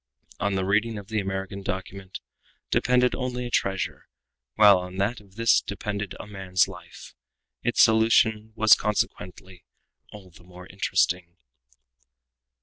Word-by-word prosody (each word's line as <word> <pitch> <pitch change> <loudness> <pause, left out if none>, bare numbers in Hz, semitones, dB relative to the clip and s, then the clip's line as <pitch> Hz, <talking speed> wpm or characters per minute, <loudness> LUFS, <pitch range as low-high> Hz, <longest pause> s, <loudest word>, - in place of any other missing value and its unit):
On 100 -1 -1
the 95 -1 -1
reading 110 +3 +1
of 100 0 -10
the 110 -1 -1
American 95 0 -4
document 95 0 -6 0.5
depended 125 0 +2
only 125 -1 -3
a 120 - -6
treasure, 95 -4 -2 0.5
while 105 -3 +7
on 90 0 -8
that 105 +4 -1
of 100 -2 -22
this 115 +1 +3
one - - -36
depended 100 -1 -4
a - - -7
man's 95 -3 0
life. - - -12 0.5
Its 120 - +3
solution 110 -1 +3
was 110 -1 +6
consequently 95 -3 -2 0.5
all 95 -3 -13
the 85 +1 -18
more 90 0 -13
interesting. 90 -2 -1
100 Hz, 140 wpm, -25 LUFS, 95-110 Hz, 0.5 s, while